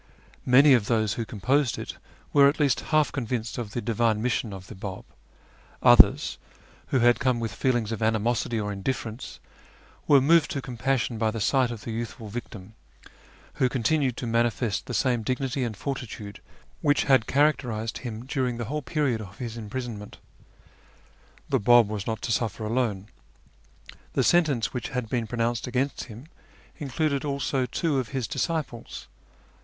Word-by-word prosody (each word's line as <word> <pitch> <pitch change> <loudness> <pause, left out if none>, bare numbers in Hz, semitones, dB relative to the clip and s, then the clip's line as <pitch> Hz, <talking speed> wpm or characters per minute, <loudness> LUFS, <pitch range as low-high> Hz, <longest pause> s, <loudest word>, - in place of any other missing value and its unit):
Many 135 +3 +7
of 115 -5 +3
those 110 -3 +1
who 115 - -3
composed 125 +6 0
it - - -6 0.4
were 140 -1 +7
at 145 - -3
least 140 -5 +3
half 155 -1 +3
convinced 120 -3 -3
of 110 -3 -5
the 120 - -2
divine 115 -1 +1
mission 115 -1 -1
of 95 -1 -8
the - - -10
Bab; 95 -1 -7 0.8
others, - - +6 0.5
who 130 - +1
had 120 0 +5
come 130 -3 +1
with 115 -1 -3
feel 130 -2 +1
ings 115 -2 -1
of 115 - -4
animosity 110 +1 +1
or 105 -1 -2
indifference, 110 +3 -4 0.7
were 140 - +7
moved 160 +4 +4
to 140 - -2
compassion 125 -2 -1
by 110 -1 +2
the 110 +1 -4
sight 130 +5 +2
of 115 -3 -6
the 115 - -5
youthful 110 -1 -5
victim, 110 -2 -8 0.9
who 130 - +4
continued 130 +1 +1
to - - -4
manifest 115 -2 0
the - - -3
same 125 -3 +1
dignity 130 +3 -1
and 115 -4 -3
fortitude 115 -6 -6 0.4
which 145 -1 +3
had 130 -4 +3
characterised 125 -6 +1
him 120 -1 -6
during 130 -3 -1
the 120 - -3
whole 150 +6 -3
period 135 -6 -1
of 100 -2 -10
his 115 -2 -5
imprisonment. 110 -1 -6 1.3
The - - +1
Bab 120 +1 +6
was 105 -2 -5
not 110 -1 -3
to 115 - -2
suffer 110 0 -1
alone. 110 -4 -1 1.0
The - - +2
sentence 155 -9 +2
which 125 - -4
had 125 -5 -3
been 120 -2 -1
pronounced 120 +1 -1
against 130 +3 -1
him 120 +2 -11 0.5
included 140 0 -1
also 140 -2 -1
two 150 -2 0
of 125 - -3
his 130 -4 -2
disciples. 150 -8 -3
120 Hz, 165 wpm, -26 LUFS, 110-135 Hz, 1.3 s, Many